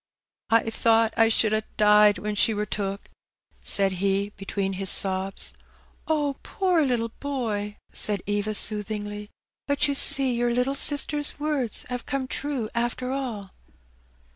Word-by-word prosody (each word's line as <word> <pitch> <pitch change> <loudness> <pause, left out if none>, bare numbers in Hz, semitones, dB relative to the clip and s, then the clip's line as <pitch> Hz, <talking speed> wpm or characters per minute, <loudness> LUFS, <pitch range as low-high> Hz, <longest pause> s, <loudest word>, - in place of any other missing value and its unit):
" - - -68
I 225 0 +3
thought 225 0 +2
I 225 0 +4
should 220 -1 +3
ha' 215 - +1 0.2
died 210 0 +5
when 210 0 -4
she 215 +1 +2
were 210 0 -2
took," 200 -1 -4 0.5
said 195 -1 +2
he, 200 +1 0
between 195 0 -3
his 190 0 -1
sobs. 190 0 0 0.5
" - - -35
Poor 315 +4 0
little 240 -5 0
boy! 220 -7 -3 0.2
'^ - - -20
said 205 -3 +5
Eva, 205 +1 -2
soothingly; 210 0 -3 0.2
" - - -68
but 285 +1 +2
you 285 - 0
see 275 -2 +4
your 240 0 0
little 250 +3 0
sister's 290 +1 +1
words 290 -6 -1
have 250 -1 -5
come 275 -2 -2
true, 275 -5 -3
after 240 +2 -2
all." 235 -8 -5
225 Hz, 155 wpm, -25 LUFS, 205-270 Hz, 0.5 s, died